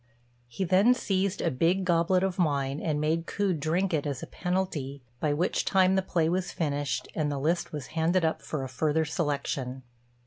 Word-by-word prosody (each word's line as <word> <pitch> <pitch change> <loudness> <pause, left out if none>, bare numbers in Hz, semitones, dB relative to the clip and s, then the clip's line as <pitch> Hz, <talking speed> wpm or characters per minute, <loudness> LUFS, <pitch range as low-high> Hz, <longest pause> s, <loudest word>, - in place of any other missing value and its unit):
He 120 +10 -4
then 195 +7 +4
seized 195 -4 -1
a 170 - +1
big 175 +8 +1
goblet 175 +1 +3
of 190 -1 -1
wine, 140 -4 +1
and 150 -3 -1
made 160 +2 0
Ku 200 -2 0
drink 170 +4 0
it 150 -1 0
as 140 -2 -4
a - - -3
penalty, 165 -7 -3 0.2
by 150 0 +1
which 160 +5 0
time 190 -1 +3
the 190 - +3
play 170 -3 0
was 180 +2 -1
finished, 145 -5 -2
and 150 -2 -1
the 140 - -2
list 165 +6 0
was 150 -4 -5
handed 165 +2 +2
up 160 - 0
for 150 -4 -4
a - - -3
further 155 +4 0
selection. 140 -4 -2
160 Hz, 195 wpm, -28 LUFS, 145-185 Hz, 0.2 s, then